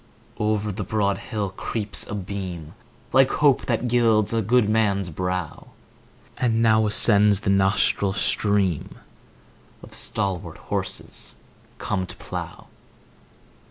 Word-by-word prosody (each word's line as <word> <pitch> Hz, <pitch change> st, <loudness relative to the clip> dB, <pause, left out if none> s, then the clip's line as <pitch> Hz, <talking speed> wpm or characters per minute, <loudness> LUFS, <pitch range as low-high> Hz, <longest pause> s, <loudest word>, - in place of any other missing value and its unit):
Over 105 Hz, 0 st, 0 dB
the 95 Hz, -, -4 dB
broad 100 Hz, -2 st, 0 dB
hill 105 Hz, -3 st, -4 dB
creeps 105 Hz, +2 st, -3 dB
a 105 Hz, -, -5 dB
beam, 90 Hz, -5 st, -6 dB, 0.4 s
Like 135 Hz, 0 st, +5 dB
hope 145 Hz, -3 st, +3 dB
that 120 Hz, 0 st, 0 dB
gilds 115 Hz, -3 st, +2 dB
a 115 Hz, -, +1 dB
good 115 Hz, +1 st, +3 dB
man's 100 Hz, -4 st, +1 dB
brow; 90 Hz, -1 st, -4 dB, 0.7 s
10 120 Hz, -3 st, +1 dB
And 115 Hz, +1 st, +1 dB
now 110 Hz, -1 st, +4 dB
ascends 105 Hz, -1 st, +5 dB
the 100 Hz, -, 0 dB
nostril 95 Hz, 0 st, +2 dB
stream 100 Hz, -4 st, 0 dB, 0.9 s
Of -, -, -13 dB
stalwart 95 Hz, -4 st, -2 dB
horses -, -, -3 dB, 0.4 s
come 95 Hz, -2 st, -2 dB
to -, -, -7 dB
plough. -, -, -7 dB
105 Hz, 125 wpm, -23 LUFS, 95-110 Hz, 0.9 s, Like